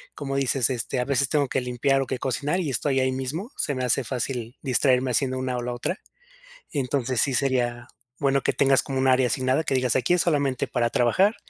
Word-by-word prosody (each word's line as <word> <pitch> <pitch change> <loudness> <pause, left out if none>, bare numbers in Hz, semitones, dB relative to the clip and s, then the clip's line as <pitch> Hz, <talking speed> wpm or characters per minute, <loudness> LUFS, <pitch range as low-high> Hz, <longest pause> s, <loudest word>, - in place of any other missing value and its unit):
como 135 -2 -4
dices, 135 -2 +2
este: 125 +1 -2
"A 125 - 0
veces 140 0 +1
tengo 145 -2 +1
que 130 - -1
limpiar 125 +2 0
o 135 - -3
que 130 - -2
cocinar 140 +8 -1
y 160 -6 -2
estoy 135 +2 0
ahí 130 0 +1
mismo, 140 - -4
se 145 - -1
me 130 - -3
hace 125 +2 +1
fácil 120 0 -4
distraerme 130 -1 +2
haciendo 130 +2 0
una 130 -1 -2
o 125 - -2
la 120 0 -3
otra". 175 +10 -3 0.7
Entonces, 130 -3 -1
sí 135 - +1
sería 120 -3 0 0.3
bueno 140 -1 +2
que - - 0
tengas 135 -1 +3
como 135 -1 -4
un 130 0 +2
área 130 0 +4
asignada, 130 +4 +1
que 135 - -1
digas: 125 -3 +1
"Aquí 130 +7 +2
es 180 - +3
solamente 140 -6 0
para 120 -1 0
trabajar 155 - +2
130 Hz, 220 wpm, -24 LUFS, 125-140 Hz, 0.7 s, área